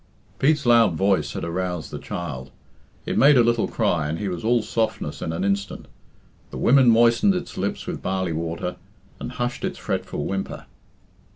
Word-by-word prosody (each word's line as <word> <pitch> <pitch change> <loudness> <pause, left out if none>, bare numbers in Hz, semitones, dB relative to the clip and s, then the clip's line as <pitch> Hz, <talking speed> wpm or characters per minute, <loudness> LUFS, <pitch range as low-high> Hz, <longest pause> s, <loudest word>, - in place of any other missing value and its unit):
Pete's 150 0 +2
loud 115 -7 +5
voice 95 -5 +1
had - - -5
aroused 90 -1 -3
the - - -5
child. 70 -7 -6 0.6
It - - 0
made 140 0 +7
a 120 - +6
little 115 -1 +2
cry, 75 -4 0
and 80 - -2
he 100 +1 -3
was 90 -2 -5
all 115 0 +2
softness 110 0 -2
in 80 - -3
an 80 - -3
instant. 100 0 -2 0.6
The - - -8
women 130 -1 +5
moistened 120 - +4
its 180 - -5
lips 100 +2 -3
with - - -5
barley 95 -2 -1
water, 85 +2 -4 0.4
and - - -6
hushed 125 0 -3
its - - -3
fretful 75 - -3
whimper. 95 0 -4
95 Hz, 175 wpm, -23 LUFS, 85-120 Hz, 0.6 s, made